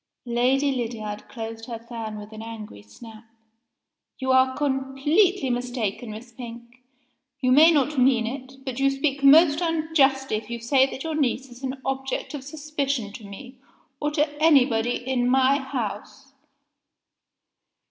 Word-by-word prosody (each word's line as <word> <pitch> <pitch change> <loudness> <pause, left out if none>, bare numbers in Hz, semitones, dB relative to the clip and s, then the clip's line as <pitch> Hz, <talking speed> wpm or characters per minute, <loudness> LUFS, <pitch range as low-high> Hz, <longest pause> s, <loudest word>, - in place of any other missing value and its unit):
Lady 255 +4 +2
Lydiard 225 -4 -5
closed 225 -2 -7
her 235 -2 -5
fan 225 -2 -7
with 210 +1 -10
an 220 0 -9
angry 220 - -9
snap. 215 - -13 0.9
"You 260 0 -1
are 260 0 +3
completely 280 +4 +1
mistaken, 245 -2 -3
Miss 220 +3 -9
Pink. 235 +1 -11 0.6
You 255 -2 +1
may 310 +5 +7
not 295 -2 +1
mean 250 -3 +4
it 265 +2 -8
but 260 -1 -4
you 275 0 +4
speak 275 0 -1
most 300 +2 +6
unjustly 305 -7 +1
if 215 +1 -9
you 235 0 -4
say 260 +3 +3
that 270 - -7
your 320 -1 -3
niece 270 -3 -1
is 245 +1 -13
an 265 0 -4
object 270 +2 -3
of 285 -3 -6
suspicion 280 -6 -3
to 225 - -10
me, 250 +6 -11 0.4
or 295 - 0
to 300 0 +1
anybody 250 -7 +4
in 245 -1 -1
my 265 +2 +4
house." 265 +1 -6
260 Hz, 145 wpm, -24 LUFS, 235-275 Hz, 0.9 s, may